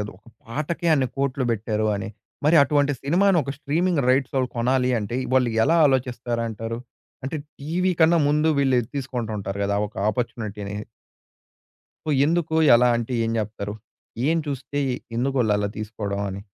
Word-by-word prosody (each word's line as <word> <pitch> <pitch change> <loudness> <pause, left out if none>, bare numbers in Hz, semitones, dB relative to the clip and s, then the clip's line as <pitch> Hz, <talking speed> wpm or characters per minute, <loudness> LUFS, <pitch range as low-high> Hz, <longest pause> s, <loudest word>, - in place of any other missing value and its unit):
గదా! 105 0 -4
ఒక 110 - -37 0.2
పాటకే 155 +8 -3
అన్ని 135 -3 +2
కోట్లు 135 -1 0
బెట్టారు 110 -1 -1
అని. 100 +2 -4 0.4
మరి 160 +2 +5
అటువంటి 145 0 +2
సినిమాని 180 +5 +3
ఒక 140 - -5
స్ట్రీమింగ్ 155 +2 0
రైట్సోళ్ళు 130 0 +2
కొనాలి 125 +2 +2
అంటే 110 +3 -3 0.2
వాళ్ళు 130 -2 +4 0.2
ఎలా 165 +4 +3
ఆలోచిస్తారంటారు? 115 -3 -2 0.5
అంటే 140 +4 -3 0.2
టీవీ 180 +5 0
కన్నా 165 +1 +5
ముందు 150 +2 +2
వీళ్ళు 135 -2 +3
ఎది 115 - -7
తీసుకుంటూ 125 -5 -3
ఉంటారు 100 0 -4
గదా! 100 0 0
ఒక - - -25 0.2
ఆపర్చునిటీని. 105 -3 -4 1.3
సో - - 0 0.2
ఎందుకు 165 -1 0 0.2
ఎలా 125 +1 +5
అంటే 120 +2 -3
ఏం 115 - -1
జెప్తారు? 105 -1 -4 0.5
ఏం 165 - +3
చూస్తే. 145 +1 -3 0.4
ఎందుకు 135 +3 0
వొళ్ళలా 105 -2 +1
తీసుకోవడం 105 -2 -4
అని? 95 +1 -5
125 Hz, 150 wpm, -24 LUFS, 110-145 Hz, 1.3 s, మరి